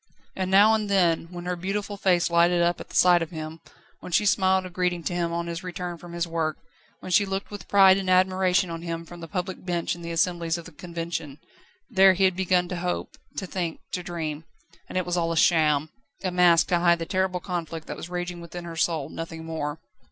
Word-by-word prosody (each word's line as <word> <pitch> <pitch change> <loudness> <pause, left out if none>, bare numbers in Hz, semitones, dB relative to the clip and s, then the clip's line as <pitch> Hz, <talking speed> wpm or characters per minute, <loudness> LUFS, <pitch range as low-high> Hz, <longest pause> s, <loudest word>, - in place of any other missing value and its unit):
And 185 -1 -2
now 205 +3 +6
and 215 -2 0
then, 175 -4 +2
when 175 0 -8
her 180 0 -1
beautiful 200 +3 -3
face 180 -3 +2
lighted 170 +1 +4
up 175 0 +1
at - - -11
sight 175 -1 +5
of 165 - -3
him, 160 -1 -7 0.4
when - - -9
she 210 - +3
smiled 190 -1 +3
a 185 - -8
greeting 180 -1 -1
to 175 - -2
him 170 -1 -1
on 170 0 -2
his 170 0 -5
return 180 -1 -5
from 175 0 -11
his 170 0 -1
work, 160 -2 -1 0.4
when 185 - -7
she 205 - +5
looked 195 +1 -4
with 205 - -8
pride 195 -1 +6
and 190 -1 -3
admiration 185 0 +3
on 165 0 -5
him 165 -1 -5
from 175 +1 -11
the 165 - -8
public 185 0 -4
bench 175 -2 -1
in 175 - -9
the 170 - -6
assemblies 170 0 0
of 170 - -9
the 165 - -11
Convention 165 -3 -5 0.5
then 190 0 +5
he 195 - +1
had 190 -1 +4
begun 180 -1 +1
to 180 - -3
hope, 180 +1 -3 0.2
to 195 - -2
think, 175 -3 -3
to 180 - -2
dream. 160 -3 -4 0.5
And - - -4
it 185 - 0
was 175 0 -1
all 165 -1 0
a 165 - -2
sham! 155 -3 +3 0.3
A 185 - 0
mask 175 -2 +4
to 175 - +3
hide 170 0 +4
the 165 - -4
terrible 185 0 0
conflict 170 -3 -5
that - - -6
was 170 - -8
raging 175 -1 -4
within 170 +1 -8
her 165 -1 -7
soul, 160 -3 0
nothing 165 0 -7
more. 155 -2 -3
175 Hz, 230 wpm, -25 LUFS, 165-185 Hz, 0.5 s, now